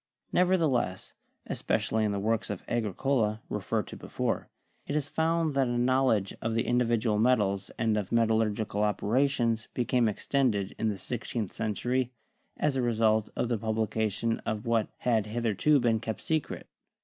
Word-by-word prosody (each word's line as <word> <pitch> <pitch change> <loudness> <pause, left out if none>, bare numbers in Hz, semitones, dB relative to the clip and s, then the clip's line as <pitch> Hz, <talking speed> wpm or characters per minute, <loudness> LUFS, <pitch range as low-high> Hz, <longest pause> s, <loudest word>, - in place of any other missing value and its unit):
Nev 180 0 +4
ertheless, 135 - 0 0.3
especially 110 0 0
in 105 - +1
the 100 - -1
works 110 +2 0
of 100 -3 -4
Agricola, 110 0 0
referred - - -1
to - - -9
before, - - -3 0.4
it 145 - -2
is 145 -1 -1
found 160 -1 +1
that 135 -1 +2
a 120 0 -1
knowledge 125 -5 +2
of 115 0 -1
the 115 - +2
individual 115 -3 +1
metals 105 -5 +2
and 110 -2 +1
of 105 -3 -2
metallurgical 110 -2 +1
operations 115 +2 +1
became 120 -2 +2
extended 105 -3 0
in 110 - +1
the 100 - -3
sixteenth 115 -1 -4
century, 120 +4 -1 0.5
as 150 -2 +1
a 130 - +1
result 110 -2 +2
of - - 0
the 120 -2 -1
publication 110 0 -1
of 110 +2 -4
what 115 -2 +2
had 110 -4 +1
hitherto 115 +6 +2
been 115 -3 +2
kept 110 -1 -4
secret. 155 -2 -2
115 Hz, 155 wpm, -29 LUFS, 110-125 Hz, 0.5 s, Nev